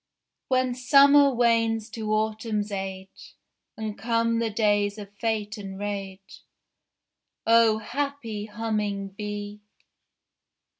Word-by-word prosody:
When 255 Hz, -1 st, +1 dB
Summer 280 Hz, +3 st, +6 dB
wanes 230 Hz, -2 st, +2 dB
to 215 Hz, -2 st, -4 dB
Autumn's 215 Hz, -1 st, -1 dB
age, 190 Hz, -1 st, -7 dB, 0.4 s
And 215 Hz, -1 st, -4 dB
come 230 Hz, +1 st, +1 dB
the 230 Hz, -1 st, 0 dB
days 205 Hz, -1 st, +1 dB
of 205 Hz, -1 st, -10 dB
fate 220 Hz, -2 st, -2 dB
and 195 Hz, -1 st, -7 dB
rage, 195 Hz, -1 st, -6 dB, 1.0 s
O 230 Hz, -1 st, +5 dB
happy 230 Hz, -2 st, -4 dB
Humming 210 Hz, -2 st, -2 dB
Bee! 205 Hz, +1 st, -6 dB
215 Hz, 100 wpm, -26 LUFS, 205-230 Hz, 1.0 s, Summer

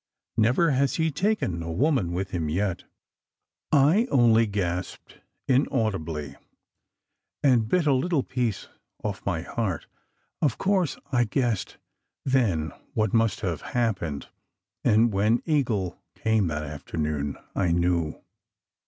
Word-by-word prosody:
Never 125 Hz, +9 st, +3 dB
has 135 Hz, +1 st, +2 dB
he 160 Hz, -1 st, +1 dB
taken 150 Hz, -, 0 dB
a 85 Hz, 0 st, -4 dB
woman 120 Hz, -, +1 dB
with 95 Hz, +2 st, -3 dB
him 80 Hz, -4 st, -2 dB
yet." 95 Hz, +2 st, -1 dB, 0.9 s
I 155 Hz, -, +4 dB
only 115 Hz, -3 st, +5 dB
gasped 90 Hz, -3 st, -4 dB, 0.3 s
inaudibly, 100 Hz, -, 0 dB, 1.1 s
and 125 Hz, -6 st, +4 dB
bit 175 Hz, +7 st, +2 dB
a 145 Hz, -, +4 dB
little 140 Hz, +2 st, +1 dB
piece 120 Hz, -5 st, -2 dB, 0.4 s
off 105 Hz, -1 st, -3 dB
my 85 Hz, -4 st, -1 dB
heart. 95 Hz, -5 st, -2 dB, 0.6 s
Of 140 Hz, -7 st, +1 dB
course 190 Hz, -5 st, +1 dB
I 120 Hz, -2 st, +3 dB
guessed 115 Hz, -3 st, -1 dB, 0.5 s
then 100 Hz, -, +1 dB, 0.2 s
what 110 Hz, -2 st, +1 dB
must 115 Hz, -1 st, +2 dB
have 85 Hz, -5 st, -2 dB
hap 115 Hz, -5 st, 0 dB
pened; 75 Hz, -4 st, -4 dB, 0.6 s
and 110 Hz, +1 st, +4 dB
when 105 Hz, +4 st, +2 dB
Eagle 120 Hz, -, 0 dB
came 110 Hz, -4 st, +1 dB
that 75 Hz, -1 st, -2 dB
afternoon, 75 Hz, -1 st, -3 dB, 0.2 s
I 90 Hz, -4 st, +1 dB
knew. 85 Hz, -2 st, +1 dB
110 Hz, 125 wpm, -26 LUFS, 85-130 Hz, 1.1 s, only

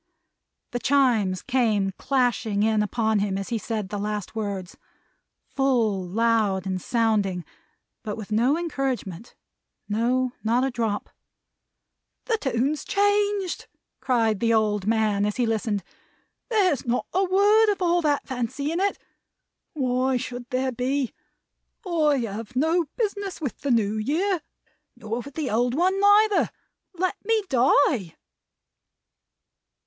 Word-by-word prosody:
The 245 Hz, -, -2 dB
Chimes 240 Hz, -9 st, +2 dB
came 215 Hz, -6 st, +1 dB
clashing 235 Hz, -3 st, 0 dB
in 215 Hz, -1 st, +2 dB
upon 220 Hz, 0 st, +1 dB
him 200 Hz, -1 st, -1 dB
as 195 Hz, +3 st, -5 dB
he 230 Hz, -2 st, -1 dB
said 215 Hz, -2 st, -4 dB
the 205 Hz, -, -4 dB
last 210 Hz, -2 st, -3 dB
words. 200 Hz, -4 st, -4 dB, 0.8 s
Full, 240 Hz, -8 st, +1 dB
loud, 205 Hz, -1 st, +1 dB
and 185 Hz, -1 st, -2 dB
sounding 210 Hz, -6 st, 0 dB, 0.6 s
but 210 Hz, -1 st, -5 dB
with 215 Hz, -1 st, -8 dB
no 245 Hz, +8 st, +3 dB
encouragement. 260 Hz, -, -3 dB, 0.5 s
No, 245 Hz, +4 st, +1 dB
not 235 Hz, +3 st, +2 dB
a 270 Hz, -, 0 dB
drop. 225 Hz, -4 st, -2 dB, 1.1 s
"The 450 Hz, -2 st, 0 dB
tune's 270 Hz, -, 0 dB
changed," 410 Hz, -2 st, 0 dB, 0.3 s
cried 225 Hz, -5 st, +1 dB
the 230 Hz, -1 st, +2 dB
old 210 Hz, -2 st, +1 dB
man, 215 Hz, -2 st, +2 dB
as 210 Hz, 0 st, 0 dB
he 245 Hz, -, +1 dB
listened. 220 Hz, -3 st, -1 dB, 0.7 s
"There's 380 Hz, -, +2 dB
not 240 Hz, +1 st, -1 dB
a 380 Hz, +2 st, +2 dB
word 410 Hz, +4 st, +4 dB
of 400 Hz, -, -3 dB
all 350 Hz, -1 st, +2 dB
that 295 Hz, -3 st, +1 dB
fancy 260 Hz, +4 st, -3 dB
in 335 Hz, -, -1 dB
it. 400 Hz, +1 st, +1 dB, 0.8 s
Why 255 Hz, -2 st, +1 dB
should 245 Hz, 0 st, -6 dB
there 260 Hz, +1 st, 0 dB
be? 255 Hz, +1 st, -1 dB, 0.7 s
I 310 Hz, -5 st, +2 dB
have 225 Hz, +2 st, -6 dB
no 320 Hz, +6 st, +2 dB
business 405 Hz, -4 st, -2 dB
with 285 Hz, -7 st, -4 dB
the 280 Hz, -, -3 dB
New 220 Hz, -3 st, +2 dB
Year 330 Hz, -, 0 dB, 0.5 s
nor 225 Hz, +2 st, -4 dB
with 270 Hz, +2 st, -9 dB
the 305 Hz, -4 st, -2 dB
old 240 Hz, +3 st, +1 dB
one 370 Hz, +5 st, +2 dB
neither. 410 Hz, +1 st, +5 dB, 0.5 s
Let 365 Hz, +1 st, -2 dB
me 440 Hz, 0 st, +1 dB
die!" 250 Hz, -, +3 dB
245 Hz, 135 wpm, -25 LUFS, 215-305 Hz, 1.1 s, neither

